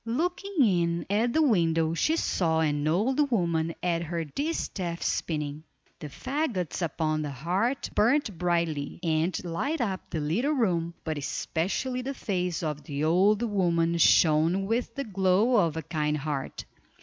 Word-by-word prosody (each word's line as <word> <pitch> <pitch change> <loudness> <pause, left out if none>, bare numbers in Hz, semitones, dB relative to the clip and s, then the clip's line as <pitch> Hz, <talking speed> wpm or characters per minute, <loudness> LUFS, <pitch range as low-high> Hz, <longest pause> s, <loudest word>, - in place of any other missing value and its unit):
Looking 355 +11 -2
in 170 -4 +1
at 225 +4 +2
the 315 +5 +3
window 165 - +2
she 310 - +1
saw 165 - +1
an 150 -1 0
old 255 - +2
woman 170 -7 0
at 170 -2 +1
her 170 0 -3
distaff 180 - -3
spinning. 150 -2 -2 0.4
The 150 - -6
faggots 245 - -3
upon 155 -1 -1
the 150 - -3
hearth 180 - -1
burned 235 -1 +2
brightly, 170 -5 -1
and 165 +2 0
lighted 260 - -2
up 195 -5 -3
the 165 - -3
little 210 - 0
room, 170 - 0
but 155 -2 -3
especially 200 - -2
the 270 +2 -4
face 180 -6 -2
of 150 -2 -3
the 145 -2 -3
old 195 +7 +3
woman 170 -6 +1
shone 165 +4 +4
with 230 +2 -1
the 275 - -2
glow 195 +3 +2
of 165 -6 +2
a 160 - -3
kind 150 -2 -1
heart. 145 -2 -4
175 Hz, 150 wpm, -27 LUFS, 160-230 Hz, 0.4 s, shone